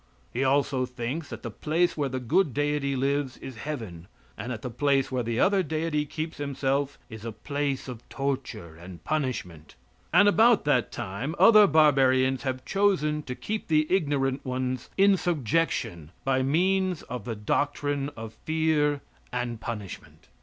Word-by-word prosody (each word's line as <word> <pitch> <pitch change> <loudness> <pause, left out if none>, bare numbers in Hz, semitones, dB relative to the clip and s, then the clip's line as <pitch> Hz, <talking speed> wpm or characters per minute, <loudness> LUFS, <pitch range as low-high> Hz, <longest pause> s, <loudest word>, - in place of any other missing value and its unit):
He 125 - 0
also 135 -1 +2
thinks 125 +6 -4
that - - -8
the - - -5
place 170 +3 0
where 145 -3 -1
the 130 0 -3
good 130 +4 +1
deity 145 -1 0
lives 135 0 0
is 130 -3 -9
heaven, 110 - -6 0.3
and 120 +4 -5
that 110 -3 -6
the 125 - -4
place 140 +1 +1
where 130 -1 0
the 115 0 -2
other 195 0 +4
deity 155 -2 -1
keeps 155 +2 -5
himself 140 0 -1
is 110 -3 -10
a 115 - -4
place 140 +4 -3
of 125 -2 -9
torture 125 - -4
and 85 +1 -11
punishment. 125 - -3 0.4
And 205 - +6
about 220 0 +5
that 125 -7 +2
time 110 - -4
other 210 +2 +8
barbarians 135 -5 +4
have 130 -1 -3
chosen 185 -7 +1
too 125 -4 -6
keep 215 +9 -4
the 155 -1 +3
ignorant 140 -5 0
ones 130 -1 -3
in 195 0 +5
subjection 135 - -1 0.2
by 130 -1 +2
means 180 +5 +1
of 125 -4 -6
the 115 - -3
doctrine 145 +5 -1
of 110 -1 -7
fear 155 -2 +1 0.3
and 120 -2 -3
punishment. 105 -5 -7
140 Hz, 160 wpm, -27 LUFS, 125-155 Hz, 0.4 s, other